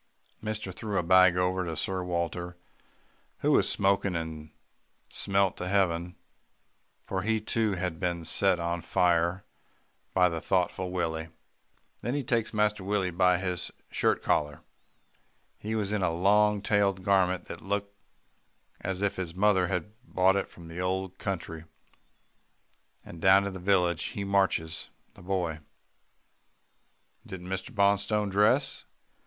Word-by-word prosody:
"Mister 110 -3 -3
threw 105 +2 -4
a - - +1
bag 95 0 +5
over 90 -2 0
Sir 95 +4 -2
Walter, 85 0 -3 0.8
who - - +2
was - - +4
smoking 100 -1 +2
and 80 -2 -5 0.6
smelt 100 -1 +1
to 90 - -4
heaven, 90 -3 0 0.9
for 95 - -2
he 110 +2 +1
too 110 0 0
had 90 -3 -3
been 85 -2 -2
set 95 +2 +3
on 85 0 -2
fire 85 +3 +1 0.7
by 90 -1 +5
the 85 -2 -3
thoughtful 90 0 0
Willie. 80 -3 -2 0.7
Then 120 +4 -2
he 145 - -1
takes 115 -2 0
Master 105 -2 +1
Willie 95 -2 0
by 90 +1 +3
his 90 -1 -3 0.2
shirt - - +1
collar 75 +1 0 1.0
he 110 +1 -3
was 105 -2 -1
in 105 - 0
a 90 - +2
long 105 +4 +3
tailed 100 -2 +1
garment 95 -2 +2
that - - -8
looked 100 +1 -3 0.9
as 95 +1 -3
if 100 0 0
his 90 -2 -4
mother 95 -2 +3
had 95 +3 -3
brought 95 -5 +2
it 100 - -1
from 85 -1 -13
the 85 +2 -6
old 95 0 -2
country, 85 -4 -4 1.4
and 85 - -11
down 95 +1 +6
to 100 - -3
the 95 - -7
village, 90 -3 +2
he 100 - -4
marches 95 -5 0 0.2
the - - -16
boy." 90 -4 -2 1.6
"Didn't 90 -1 -9
Mr. 95 0 -3
Bonstone 100 +1 +2
dress?" 115 +8 +2
95 Hz, 140 wpm, -28 LUFS, 85-100 Hz, 1.6 s, down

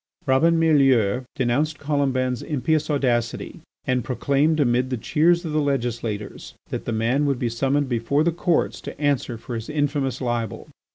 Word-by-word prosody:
Robin 160 +5 +3
Mielleux 130 -7 +3
denounced 140 +5 0
Colomban's 135 -4 0
impious 155 +2 -1
audacity 120 -5 -1 0.3
and 125 -1 0
proclaimed 140 +4 +1
amid 125 -2 +2
the 130 - -2
cheers 170 - +2
of 160 - -3
the 155 0 +1
legislators 120 -6 -3 0.2
that - - -4
the - - -2
man 120 +6 +1
would 140 -2 +1
be 120 -1 -1
summoned 135 +4 0
before 125 +4 +1
the 170 - +2
Courts 170 0 0
to - - -8
answer 140 -5 0
for 120 +2 -8
his 115 -1 -5
infamous 145 -3 -1
libel. 120 -4 -3
135 Hz, 160 wpm, -23 LUFS, 120-150 Hz, 0.3 s, Robin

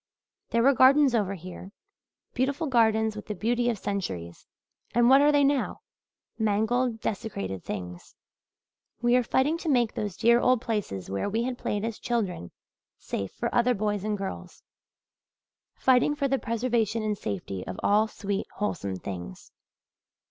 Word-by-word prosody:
There 230 0 +2
were 275 +2 +6
gardens 270 +1 +5
over 200 -4 0
here 185 +2 -10 0.6
beautiful 275 +6 0
gardens 220 -4 +2
with 210 - -8
the 210 - -4
beauty 240 +5 0
of 230 - -1
centuries 95 - -5 0.5
and 240 +1 +5
what 270 +1 +7
are 295 +1 +5
they 290 -1 +4
now? 280 -1 0 0.6
Mangled, 220 +3 +1
desecrated 100 - -4
things! 90 -3 -7 0.9
We 240 +1 +4
are 250 - +5
fighting 275 +7 +1
to 330 - -3
make 245 -5 +2
those 205 -4 -4
dear 235 +1 +5
old 255 0 +3
places 205 - -3
where 100 - -1
we 225 +3 0
had 250 0 -3
played 210 +1 -2
as 225 -2 -4
children, 195 - -2 0.5
safe 100 -1 -4
for 235 - -4
other 245 +1 +3
boys 205 -1 -1
and 210 -1 -1
girls 195 -1 -7 1.1
fighting 260 +3 +3
for 280 -2 0
the 270 0 0
preservation 230 -2 0
and 215 -1 0
safety 100 - -5
of 90 - -6
all 210 +2 +4
sweet, 200 -1 -4
wholesome 165 - -2
things. 90 -8 -8
220 Hz, 155 wpm, -27 LUFS, 195-245 Hz, 1.1 s, what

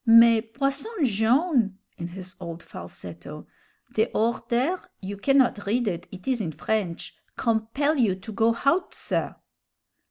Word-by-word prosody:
"Mais, 230 -1 +8
Posson 275 - 0 0.2
Jone'!" 230 - +2 0.2
in 170 - -3
his 185 +1 -8
old 170 0 -7
falsetto 85 0 -9 0.5
"de 220 - +3
order 240 +8 +1 0.2
you 200 +1 -5
cannot 245 -2 +3
read 240 +3 +1
it, 175 -3 -2
it 185 +3 -11
is 255 -3 +1
in 165 -6 -3
French 195 -2 -2 0.2
compel 230 +7 +1
you 220 -8 +3
to 195 +4 -9
go 225 +2 +3
hout, 275 +10 +1
sir!" - - -2
225 Hz, 135 wpm, -26 LUFS, 190-255 Hz, 0.5 s, Mais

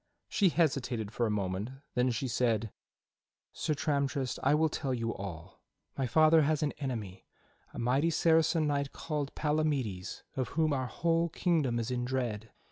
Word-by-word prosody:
She 195 -3 +3
hesitated 130 -10 0
for 120 +1 0
a - - -1
moment, 100 +1 -2 0.2
then 125 +1 +2
she 125 +2 -1
said: 115 -3 0 0.8
"Sir 155 - -1
Tramtrist, 140 -3 -1
I 140 +2 +4
will 160 +1 +3
tell 140 -4 -2
you 115 -1 -2
all. 90 -3 -8 0.3
My 135 - -1
father 155 +5 +5
has 155 +1 +1
an 145 - +1
enemy, 115 -9 -5 0.4
a - - -11
mighty 130 +7 +2
Saracen 160 0 +3
knight 140 -1 -1
called 150 -3 -3
Palamides 145 -11 -1
of 130 -2 -1
whom 155 -2 +3
our 130 -2 -1
whole 170 +4 +1
kingdom 155 -8 +1
is 115 +1 -2
in 125 -1 -1
dread. 120 -4 -2
135 Hz, 160 wpm, -31 LUFS, 115-155 Hz, 0.8 s, father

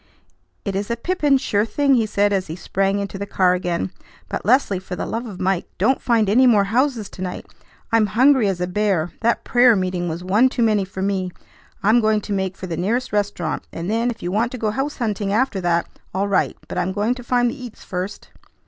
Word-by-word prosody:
"It 195 - -2
is 200 +2 -2
a 235 - -1
pippin, 295 -1 +2
sure 205 -5 +1
thing," 280 +5 +2
he 230 -4 +3
said 205 -1 +1
as 190 -1 0
he 160 - -5
sprang 195 +2 0
into 200 -1 -4
the 200 - -4
car 185 -2 +3
again; 175 - -2 0.4
"but, - - -3
Leslie, 215 -3 +3
for 185 0 -7
the - - -3
love 235 +2 -4
of 195 -5 -8
Mike, 185 -1 0
don't 265 - +2
find 230 -3 +2
any 250 +6 +5
more 210 -4 +5
houses 235 +1 0
to - - -11
night! 180 -1 -4 0.5
I'm 225 -2 +4
hungry 250 +2 +4
as 190 -3 -1
a 180 - 0
bear. 180 -3 0
That 235 +1 +1
prayer 245 -2 +5
meeting 185 -2 -1
was 165 +2 -5
one 210 +8 +4
too 245 -2 0
many 210 -3 +2
for 190 0 -5
me; 190 -2 -1 0.5
I'm 215 +4 +5
going 215 -1 +2
to 205 - -4
make 190 -1 -2
for - - -6
the 170 -2 -4
nearest 230 +8 -1
restaurant; 205 -1 -2
and 170 +4 -4
then, 230 +2 +1
if 230 -5 -6
you 175 - -2
want 225 +4 +1
to - - -4
go 220 -2 -1
house 270 +6 -3
hunting 210 -4 -1
after 220 -2 +1
that, 170 -1 +1 0.3
all 195 +2 +1
right; 200 -2 +1
but - - -3
I'm 180 +1 -1
going 210 +4 +1
to 250 -1 -9
find 245 0 +2
the 255 +1 -9
eats 240 -3 -10
first." 185 +2 -5
205 Hz, 230 wpm, -21 LUFS, 190-235 Hz, 0.5 s, any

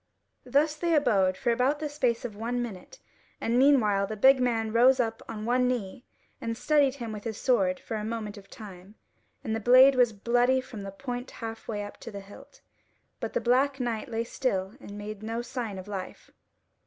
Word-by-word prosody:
Thus 300 +2 +2
they 335 +1 +1
abode 200 -10 +2
for 245 -3 0
about 255 +5 +2
the 305 0 -3
space 255 -5 -1
of 220 -4 -6
one 235 +3 -2
minute: 240 - -7 0.4
and 235 +2 +1
meanwhile 215 -8 +4
the 215 - -5
big 265 +5 +6
man 225 -3 0
rose 255 +3 +5
up 225 -2 -1
on 215 -1 -5
one 250 +1 +2
knee 245 -1 -3 0.4
and 230 0 -3
steadied 285 -2 +2
him 235 -5 -6
with 210 -1 -7
his 225 -2 -4
sword 195 -8 +1
for 225 - -6
a 210 - -4
moment 220 -1 -4
of 200 -2 -14
time, 195 -1 -12 0.5
and 220 -4 -2
the - - -2
blade 255 +4 +7
was 250 -3 +4
bloody 245 +5 +2
from 245 -5 -8
the 195 - -6
point 245 +5 -6
half 225 -1 -8
way 210 -2 -3
up 205 - -9
to - - -9
the 200 -2 -7
hilt; 205 - -15 0.6
but - - -4
the - - 0
black 270 +3 +2
knight 235 -3 -3
lay 230 0 -1
still 200 -6 -2
and 205 - -10
made 210 0 -7
no 225 +2 -3
sign 240 -5 -5
of 185 +1 -8
life. 195 -3 -7
230 Hz, 205 wpm, -28 LUFS, 210-255 Hz, 0.6 s, blade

